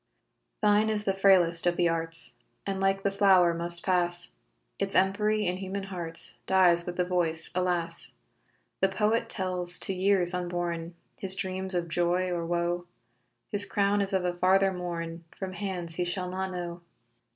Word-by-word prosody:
Thine 210 +1 +3
is 210 -1 -1
the 195 - 0
frailest 180 -3 +4
of 175 0 +1
the 175 - +3
arts 165 0 -2 0.3
And 195 -1 -3
like 195 0 +1
the 200 - +1
flower 190 -3 +4
must 170 0 -4
pass; 175 - +3 0.5
Its - - -2
empery 210 +3 +2
in 180 +1 -1
human 195 +1 -5
hearts 175 -4 +2
Dies 175 -2 +3
with 175 - -4
the 180 - +1
voice, 170 -3 -1
alas! 175 -2 -1 0.6
The 190 - +2
poet 210 +4 0
tells 180 -2 0
to 195 - +2
years 185 -1 +3
unborn 175 -1 -3 0.2
His 190 -1 -2
dreams 190 -1 -3
of 175 -1 -1
joy 175 +2 0
or 170 -1 -3
woe; 175 0 -2 0.6
His 205 -1 +3
crown 200 +1 +1
is 195 0 0
of 190 -2 0
a 180 - 0
farther 190 +2 +2
morn, 170 -2 -5
From 190 -1 -5
hands 180 -4 -5
he 180 - 0
shall 180 +1 -3
not 190 +1 -3
know. 175 -1 -6
180 Hz, 165 wpm, -28 LUFS, 175-195 Hz, 0.6 s, frailest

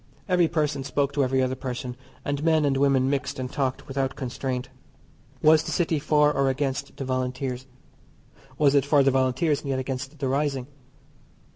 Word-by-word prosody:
Every 180 -3 +3
person 150 -4 -1
spoke 140 +1 -1
to 140 - +2
every 130 0 +2
other 130 0 0
person, 125 -1 -5 0.3
and 145 +1 -2
men 160 -2 +3
and 140 -1 +2
women 135 -1 +3
mixed 140 0 -1
and 130 -1 -4
talked 130 -2 -2
without 135 -1 -2
constraint. 130 -1 -4 0.7
Was 155 0 +6
the - - -6
City 165 -3 +1
for 150 0 +3
or 135 -1 +2
against 135 0 -2
the 135 - -4
Volunteers? 130 0 -3 0.9
Was 145 -2 +4
it 140 -2 +4
for 145 0 +4
the 135 - +4
Volunteers, 135 +3 +1
and 140 - -6
yet 135 - 0
against 135 +3 -4
the 135 -2 -2
rising? 135 -1 0
135 Hz, 175 wpm, -25 LUFS, 130-145 Hz, 0.9 s, Was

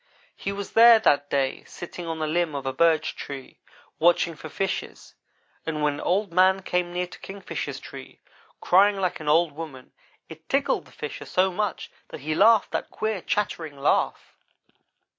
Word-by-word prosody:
He 195 - -4
was 200 0 -6
there 230 0 +9
that 145 -9 +2
day, 135 -1 -1
sitting 175 0 -8
on 165 -1 -3
the 155 - -2
limb 160 -1 0
of 140 -1 -4
a 135 - -2
birch 160 +1 +2
tree, 135 -2 -8 0.4
watching 170 0 +3
for 155 - -9
fishes, 195 +4 -4 0.5
and 155 -2 -3
when 145 -1 0
Old 190 0 0
man 190 +1 +4
came 180 -1 -1
near 180 +1 -1
to 180 - -13
Kingfisher's 195 0 -6
tree, - - -11 0.4
crying 200 +2 +4
like 185 -2 -1
an 150 -1 -3
old 165 +1 +4
woman, 145 -4 -9 0.4
it 160 0 -13
tickled 275 +1 +1
the - - -19
Fisher - - -7
so 190 +1 +1
much 200 0 -3 0.2
that - - -9
he 155 +3 -2
laughed 215 +5 +5
that - - -3
queer, 215 -3 -3
chattering 165 -8 -2
laugh. 135 - 0
175 Hz, 170 wpm, -25 LUFS, 155-195 Hz, 0.5 s, there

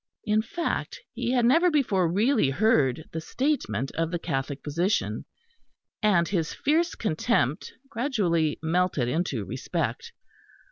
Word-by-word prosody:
In 215 +1 +2
fact, 330 +10 -3
he - - -2
had 245 -2 +3
never 330 +9 +5
before 200 - +2
really 215 - +3
heard 145 - +2
the 160 - -4
statement 255 - -1
of 165 0 -1
the 175 - -2
Catholic 135 -3 -3
position; 170 +8 -1 0.8
and 195 -6 +3
his 165 -4 -1
fierce 330 +4 +1
contempt 160 - 0 0.2
gradually 205 - 0
melted 165 -5 +1
into 130 - -1
respect. - - -3
180 Hz, 125 wpm, -26 LUFS, 155-235 Hz, 0.8 s, never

